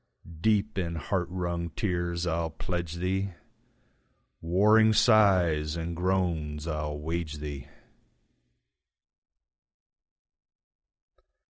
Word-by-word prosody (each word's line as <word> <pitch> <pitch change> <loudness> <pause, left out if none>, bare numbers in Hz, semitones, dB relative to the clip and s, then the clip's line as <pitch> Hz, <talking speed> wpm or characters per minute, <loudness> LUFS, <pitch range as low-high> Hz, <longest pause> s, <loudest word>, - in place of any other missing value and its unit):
Deep 105 0 +1
in 85 -2 -2
heart 90 +3 -2
wrung 85 -2 -3
tears 85 0 -2
I'll 85 -1 -1
pledge 85 +1 -4
thee, 95 +2 -1 1.1
Warring 105 +6 +4
sighs 90 -10 +4
and 85 0 -4
groans 85 -5 -1
I'll 75 -2 -3
wage 80 +1 -3
thee. 75 -3 -7
85 Hz, 80 wpm, -28 LUFS, 80-95 Hz, 1.1 s, Warring